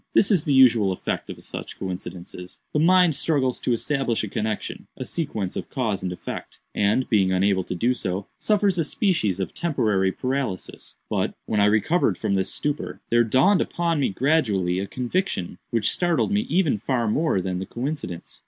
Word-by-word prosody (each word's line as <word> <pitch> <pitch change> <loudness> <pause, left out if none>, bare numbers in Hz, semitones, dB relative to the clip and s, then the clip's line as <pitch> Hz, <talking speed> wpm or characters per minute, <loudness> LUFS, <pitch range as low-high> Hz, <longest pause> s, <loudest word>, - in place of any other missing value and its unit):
This 210 - +5
is 180 -7 +3
the 145 - 0
usual 120 -7 +6
effect 90 - -3
of - - -7
such - - -7
coincidences. 90 -1 -7
The 150 - +2
mind 180 -1 +5
struggles 135 -4 0
to - - -1
establish 120 -1 0
a - - -2
connexion—a 110 +2 -4
sequence 110 - -3
of - - -5
cause 110 -7 -1
and 90 -1 -3
effect—and, 105 +5 -2
being 95 -5 +3
unable 95 0 +2
to - - -4
do 120 +8 +2
so, 95 -5 -3
suffers 205 -4 +2
a - - +3
species 145 - 0
of 95 - -3
temporary 105 - +1
paralysis. 130 -4 -4
But, - - -1
when 105 - 0
I 100 - +5
recovered 110 - +2
from - - -1
this 95 -1 0
stupor, 145 0 -3
there 120 0 +5
dawned 135 - +4
upon 170 -2 0
me 140 - +2
gradually 100 - +1
a 100 - -3
conviction 125 - -2
which 115 -3 +1
startled 175 +2 +1
me 210 +4 +1
even 165 - +2
far 120 +1 0
more 145 - +1
than 90 0 -2
the 95 - -5
coincidence. 125 - -5
120 Hz, 175 wpm, -24 LUFS, 95-155 Hz, -, usual